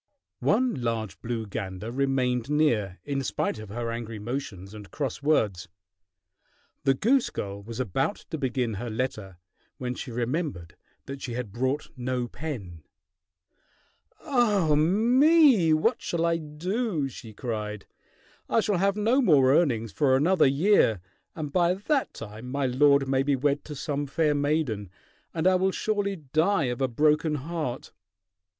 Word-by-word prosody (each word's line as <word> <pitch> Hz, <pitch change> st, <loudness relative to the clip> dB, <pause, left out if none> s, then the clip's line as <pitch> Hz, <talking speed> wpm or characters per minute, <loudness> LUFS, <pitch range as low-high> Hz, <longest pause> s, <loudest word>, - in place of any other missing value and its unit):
One 255 Hz, -1 st, +2 dB
large 115 Hz, -5 st, -3 dB
blue 115 Hz, -1 st, -3 dB
gander 100 Hz, +1 st, -5 dB
remained 130 Hz, -2 st, 0 dB
near, 115 Hz, -11 st, +1 dB
in 140 Hz, -1 st, -1 dB
spite 125 Hz, -, -2 dB
of 110 Hz, -2 st, -9 dB
her 115 Hz, +2 st, -3 dB
angry 115 Hz, -1 st, -5 dB
motions 105 Hz, -4 st, -5 dB
and 105 Hz, -2 st, -10 dB
cross 140 Hz, -3 st, -4 dB
words. 110 Hz, -, +1 dB, 1.2 s
The 135 Hz, -, +4 dB
goose 250 Hz, -, +2 dB
girl 100 Hz, 0 st, -5 dB
was 115 Hz, +3 st, -8 dB
about 130 Hz, -, 0 dB, 0.2 s
to 160 Hz, -, -3 dB
begin 125 Hz, -4 st, -1 dB
her 115 Hz, +4 st, -4 dB
letter 110 Hz, -5 st, -4 dB, 0.4 s
when 125 Hz, -1 st, -3 dB
she 130 Hz, -, -7 dB
remembered 120 Hz, -, -3 dB, 0.3 s
that 135 Hz, 0 st, -7 dB
she 120 Hz, -, -5 dB
had 120 Hz, -4 st, -4 dB
brought 130 Hz, +6 st, -2 dB
no 125 Hz, -1 st, -2 dB
pen. 110 Hz, -, -7 dB, 1.4 s
"Ah 215 Hz, -, +2 dB
me! 230 Hz, -, +5 dB
What 155 Hz, +11 st, +2 dB
shall 170 Hz, -1 st, -1 dB
I 170 Hz, 0 st, +2 dB
do?" 165 Hz, -, -2 dB
she 115 Hz, -3 st, -10 dB
cried. 105 Hz, -2 st, -5 dB, 0.6 s
"I -, -, +3 dB
shall 210 Hz, -3 st, +1 dB
have 195 Hz, +2 st, +2 dB
no 230 Hz, +6 st, +3 dB
more 140 Hz, -, +5 dB
earnings 120 Hz, -9 st, +2 dB
for 130 Hz, +7 st, +2 dB
another 160 Hz, +3 st, +4 dB
year, 140 Hz, -, +3 dB, 0.4 s
and 150 Hz, -3 st, -5 dB
by 175 Hz, 0 st, +3 dB
that 270 Hz, +8 st, -1 dB
time 110 Hz, +3 st, -8 dB
my 140 Hz, +1 st, -1 dB
lord 140 Hz, +2 st, +4 dB
may 135 Hz, 0 st, +2 dB
be 140 Hz, 0 st, +2 dB
wed 140 Hz, +2 st, 0 dB
to 150 Hz, -, -7 dB
some 145 Hz, +1 st, -3 dB
fair 150 Hz, +2 st, +1 dB
maiden, 145 Hz, -, -1 dB, 0.4 s
and 160 Hz, 0 st, -3 dB
I 185 Hz, -, +6 dB
will 185 Hz, +1 st, +2 dB
surely 205 Hz, -1 st, -1 dB
die 160 Hz, +5 st, +1 dB
of 125 Hz, -, -8 dB
a 130 Hz, -, +3 dB
broken 150 Hz, +4 st, +2 dB
heart!" 150 Hz, -3 st, -4 dB
140 Hz, 150 wpm, -27 LUFS, 115-165 Hz, 1.4 s, I